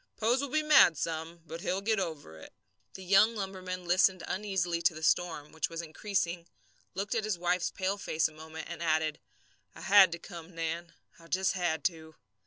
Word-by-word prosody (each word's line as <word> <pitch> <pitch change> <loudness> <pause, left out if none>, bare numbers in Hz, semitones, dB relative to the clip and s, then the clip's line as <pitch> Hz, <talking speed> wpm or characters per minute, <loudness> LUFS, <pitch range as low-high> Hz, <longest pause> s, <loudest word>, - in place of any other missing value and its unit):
Pose 235 +4 +2
will 280 - -3
be 310 +3 +1
mad 270 - +6
some, 165 +2 -4
but 165 +1 -8
he'll 185 +2 -1
get 215 +1 0
over 160 - -5
it." 80 - -12 0.4
The 190 - -8
young 200 +5 +5
lumberman 185 -3 -5
listened 185 0 +3
uneasily 185 -4 -1
to 165 0 +2
the 155 - -8
storm, 160 -2 0
which 160 - -2
was 165 0 -5
increasing, 170 0 -2 0.5
looked 200 +4 -2
at 225 -2 0
his 215 -4 -1
wife's 175 +1 0
pale 195 +1 -2
face 160 -4 0
a - - -14
moment, 160 +1 -9
and 170 -1 -7
added: 155 -2 0 0.6
"I - - -11
had 195 -2 +7
to - - -4
come, 170 -1 -11
Nan. 165 +1 -4 0.3
I 165 - -16
just 190 +2 +1
had 170 -5 -1
to." 160 -2 -3
175 Hz, 195 wpm, -30 LUFS, 160-195 Hz, 0.6 s, had